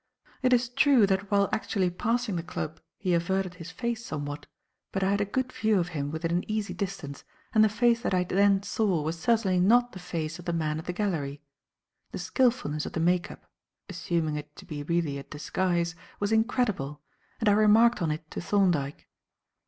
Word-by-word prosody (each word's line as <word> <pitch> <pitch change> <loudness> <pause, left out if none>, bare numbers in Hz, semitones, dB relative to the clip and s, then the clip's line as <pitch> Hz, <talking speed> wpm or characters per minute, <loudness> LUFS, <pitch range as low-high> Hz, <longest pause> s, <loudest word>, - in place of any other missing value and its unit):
It 255 -1 +2
is 245 -1 +4
true, 255 -2 +4
that 195 0 0
while 200 -1 +3
actually 190 -4 0
passing 230 +3 -1
the 170 - -1
club, 165 -2 -5 0.2
he 185 -3 0
averted 185 +2 0
his 170 -2 -9
face 235 +4 -3
somewhat; 145 -5 -5 0.4
but 195 - -1
I 190 - +2
had 200 0 +1
a - - +2
good 255 +5 -2
view 215 -1 +2
of 175 -1 0
him 145 -4 -3
within 160 +2 -3
an 175 +4 -1
easy 215 -1 -2
distance, 180 -8 -5 0.3
and 215 -2 +6
the 215 - +5
face 235 +2 +2
that - - -1
I 180 -1 +2
then 195 +2 +3
saw 195 -7 0
was 160 +2 -3
certainly 200 -2 +2
not 240 +6 +4
the 185 - -9
face 170 -2 -4
of 175 - -11
the 170 - -1
man 155 -2 -1
at 160 - -8
the - - -2
gallery. 155 -8 -2 0.7
The - - -3
skilfulness 230 - 0
of - - -8
the - - -2
make 175 +2 +2
up - - -12 0.4
assuming 160 -3 -1
it 150 0 -8
to - - -12
be 145 -1 -6
really 155 -2 -1
a - - -7
disguise 170 +4 -1 0.3
was 205 +1 -1
incredible, 220 - 0 0.4
and 225 - 0
I - - +7
remarked 215 +3 +5
on 165 - +1
it 155 +1 -3
to - - -4
Thorndyke. 175 -8 +1
185 Hz, 200 wpm, -28 LUFS, 160-215 Hz, 0.7 s, I